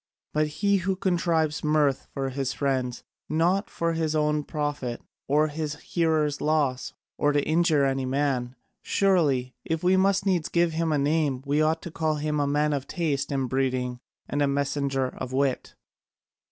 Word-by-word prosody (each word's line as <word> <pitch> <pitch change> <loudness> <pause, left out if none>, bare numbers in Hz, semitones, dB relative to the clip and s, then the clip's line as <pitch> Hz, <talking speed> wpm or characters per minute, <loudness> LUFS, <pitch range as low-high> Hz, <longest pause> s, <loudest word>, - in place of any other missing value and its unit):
But 155 0 +2
he 200 +6 +1
who 190 0 -1
contrives 170 -4 0
mirth 150 -3 +2
for 135 -1 -1
his 135 0 -2
friends, 130 -3 -1 0.3
not 175 +6 +1
for 170 0 -1
his 160 -1 -1
own 150 0 +1
profit, 145 -6 -3 0.3
or 150 +2 +3
his 150 0 -3
hearers' 155 -2 0
loss, 145 -4 0 0.3
or 145 - +3
to 145 -1 +1
injure 160 -3 +3
any 135 -1 0
man, 130 -2 -1 0.3
surely, 145 -10 +2
if 160 +1 -2
we 185 +1 +4
must 195 +1 +2
needs 180 -5 +1
give 170 -1 +2
him 165 0 0
a 150 - +2
name, 145 -2 +1
we 145 +2 +1
ought 160 +1 +1
to 170 - -6
call 155 -1 0
him 150 0 -1
a 145 - +1
man 150 +1 +1
of 140 -1 -3
taste 145 -6 -1
and 135 -2 0
breeding 125 -1 -1 0.3
and 145 - -1
a 145 - +3
messenger 140 -1 0
of 130 0 -6
wit." 135 -1 -1
150 Hz, 170 wpm, -26 LUFS, 135-160 Hz, 0.3 s, we